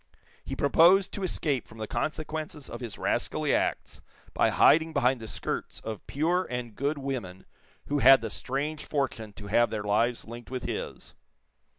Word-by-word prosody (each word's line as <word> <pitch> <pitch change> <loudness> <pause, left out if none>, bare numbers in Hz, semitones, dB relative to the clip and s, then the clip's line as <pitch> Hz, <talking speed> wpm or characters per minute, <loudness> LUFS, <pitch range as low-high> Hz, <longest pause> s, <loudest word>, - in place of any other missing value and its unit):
He 135 - -5
proposed 170 +8 +5
to 200 - -5
escape 150 - -1
from 110 - -14
the 110 - -4
consequences 155 +2 -4
of - - -6
his 115 -5 -6
rascally - - 0
acts - - -1 0.3
by - - +3
hiding 160 0 +4
behind 125 -2 +2
the 110 - -7
skirts - - -4
of 110 -2 -7
pure 170 +6 +1
and 125 -2 -4
good 145 +3 -1
women 125 -10 -5 0.4
who 145 0 0
had 135 +1 +8
the 110 -2 -4
strange 145 +6 -3
fortune 125 -7 -2
to 100 - -10
have 120 +4 +3
their 105 -2 -3
lives 115 +4 +1
linked 120 +1 -10
with 130 -1 -4
his. - - -5
130 Hz, 170 wpm, -28 LUFS, 115-150 Hz, 0.4 s, had